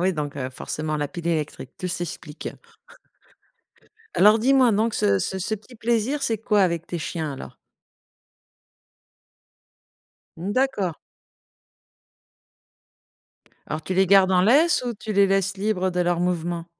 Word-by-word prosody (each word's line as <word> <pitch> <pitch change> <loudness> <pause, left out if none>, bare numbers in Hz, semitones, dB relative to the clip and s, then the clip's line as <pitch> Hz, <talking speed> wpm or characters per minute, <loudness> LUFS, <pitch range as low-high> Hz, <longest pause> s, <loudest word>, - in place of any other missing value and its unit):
Oui, 185 +1 +2
donc, 145 -3 -4
heu, 130 -2 -4
forcément, 155 +4 -4
la 145 -1 -2
pile 170 +3 -7
électrique, 155 -5 -2
tout 180 - -3
s'explique. 170 -3 -5 1.7
Alors 210 +3 +6
dis-moi, 255 0 +4
donc 220 +2 +1
ce 100 -1 +2
ce 190 - -2
ce 210 +4 -2
petit 215 +4 -13
plaisir, 235 +5 0
c'est 225 -5 0
quoi 210 -2 +2
avec 170 -2 0
tes 175 - -4
chiens, 155 -1 -4
alors? 135 - -9 2.8
Mmh, 185 +5 -4
d'accord. 230 - 0 2.7
Alors 155 +1 -4
tu 185 +4 -3
les 190 +1 +4
gardes 190 0 +5
en 180 -1 +4
laisse 280 - +4
ou 240 - -2
tu 215 +1 -6
les 200 -1 +5
laisses 195 0 0
libres 190 -2 0
de 180 - -4
leurs 175 -1 +1
mouvements? 175 -1 -2
185 Hz, 140 wpm, -24 LUFS, 165-215 Hz, 2.8 s, Alors